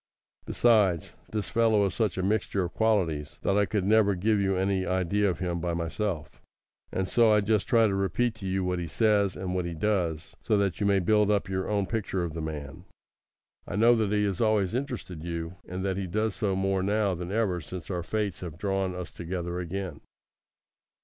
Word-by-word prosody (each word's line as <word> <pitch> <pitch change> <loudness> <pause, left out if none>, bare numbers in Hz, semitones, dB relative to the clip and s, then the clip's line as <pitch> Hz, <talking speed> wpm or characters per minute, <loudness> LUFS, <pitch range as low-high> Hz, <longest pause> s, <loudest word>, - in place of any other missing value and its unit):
Besides, 105 -8 +3 0.2
this 105 -4 -3
fellow 110 -3 +3
is 95 - -1
such 110 -6 0
a 95 - -1
mixture 100 -1 0
of 90 - -5
qualities, 90 -10 0
that 100 - +2
I 100 -1 +3
could 105 -4 -1
never 105 -1 +4
give 105 +3 +1
you 95 -1 +1
any 95 0 +1
idea 95 +2 +1
of 90 - -2
him 85 -2 -2
by 85 0 -2
myself; 85 0 -3 0.5
and 95 0 -1
so 115 +1 +4
I 105 - +5
just 105 0 +1
try 115 -3 +5
to 100 - +1
repeat 95 +5 0
to 100 -3 -6
you 95 0 0
what 90 -1 -1
he 85 - -3
says, 105 -1 +2
and 90 -1 -4
what 90 -1 -1
he 85 -1 -4
does, 85 -4 -1
so 110 - +1
that 100 -3 0
you 100 - +1
may 100 -1 +3
build 105 +2 +3
up 105 -2 +1
your 95 -1 -2
own 100 -2 +1
picture 100 -4 -2
of 85 -3 -4
the 80 - -4
man. 75 -3 -6 0.8
I - - -4
know 115 +3 +6
that 110 -3 +1
he 105 0 +2
has 95 -3 -2
always 110 -3 +2
interested 125 - -4
you, 85 +1 -5
and 90 +2 -4
that 95 -1 -1
he 95 -1 -2
does 110 +3 0
so 100 -3 -1
more 95 0 +1
now 100 0 +1
than 90 +1 -5
ever 100 -5 0
since 90 +3 -7
our 90 -1 -2
fates 105 +1 -2
have 85 -4 -7
drawn 95 -1 -1
us 90 -1 -6
together 85 0 -4
again. 90 -2 -5
95 Hz, 210 wpm, -28 LUFS, 90-105 Hz, 0.8 s, know